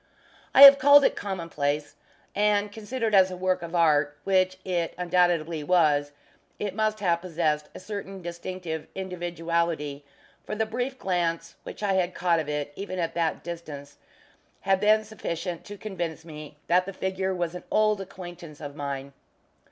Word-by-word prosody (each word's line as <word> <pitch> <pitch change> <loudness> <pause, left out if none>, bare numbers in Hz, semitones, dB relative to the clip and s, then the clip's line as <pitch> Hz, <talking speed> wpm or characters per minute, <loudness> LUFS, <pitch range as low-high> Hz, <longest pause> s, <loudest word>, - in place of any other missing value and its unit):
I 275 - +10
have 280 0 +12
called 285 +1 +7
it - - +2
commonplace; 155 -7 -3 0.4
and 205 0 +2
considered 220 +1 -3
as 190 -1 +6
a 185 - -6
work 185 0 0
of 170 +1 -6
art, 150 -3 +3
such 185 -1 +2
it 175 -3 -1
undoubtedly 175 -3 +1
was; 145 -4 +3 0.5
yet 205 - -2
it - - -9
must 215 -1 0
have 170 -3 +1
possessed 155 -4 -1
a - - -7
certain 195 -1 -7
distinctive 170 -2 -5
individuality, 170 -5 -2 0.4
for - - -5
the 220 +1 0
brief 245 +4 -3
glance 175 -6 -1
which - - -9
I 200 -1 +2
had 185 -1 0
caught 175 -2 +2
of 155 -2 -4
it, 145 -1 -3
even 195 +1 -5
at 165 -2 -2
that 165 -2 -1
distance, 150 -4 -8 0.6
had 195 -1 +2
been 215 +1 +4
sufficient 180 -5 -5
to 205 0 -9
convince 175 -6 -5
me 150 -2 -10
that 180 +1 +2
the 195 - -5
figure 190 0 -2
was 175 -2 -2
an 180 - -8
old 215 -1 +2
acquaintance 175 -5 -10
of 145 -2 -8
mine. 140 -2 -5
175 Hz, 165 wpm, -26 LUFS, 160-195 Hz, 0.6 s, have